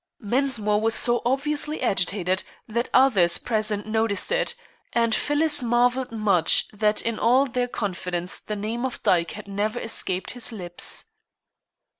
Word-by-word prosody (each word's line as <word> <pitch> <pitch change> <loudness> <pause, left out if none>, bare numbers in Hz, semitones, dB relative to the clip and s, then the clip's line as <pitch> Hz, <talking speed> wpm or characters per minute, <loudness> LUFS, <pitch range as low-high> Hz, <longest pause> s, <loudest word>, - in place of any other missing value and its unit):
Mensmore 220 -3 0
was 225 0 +1
so 240 -1 +2
obviously 295 +3 +1
agitated 190 -1 0 0.3
that 235 +2 -2
others 200 -10 +4
present 215 -3 -2
noticed 220 - 0
it, - - +1 0.4
and 230 -1 +2
Phyllis 295 +2 +2
marvelled 245 +2 +1
much 205 -7 +2
that 210 0 0
in 230 -1 -2
all 255 +4 +4
their 250 -1 -2
confidence 180 -5 -3
the 210 - -6
name 220 +4 -4
of 260 -1 -4
Dyke 170 -2 +2
had 210 - -10
never 205 +3 -2
escaped 190 -5 -2
his 245 -1 -2
lips. 175 -5 -3
225 Hz, 140 wpm, -24 LUFS, 200-250 Hz, 0.4 s, others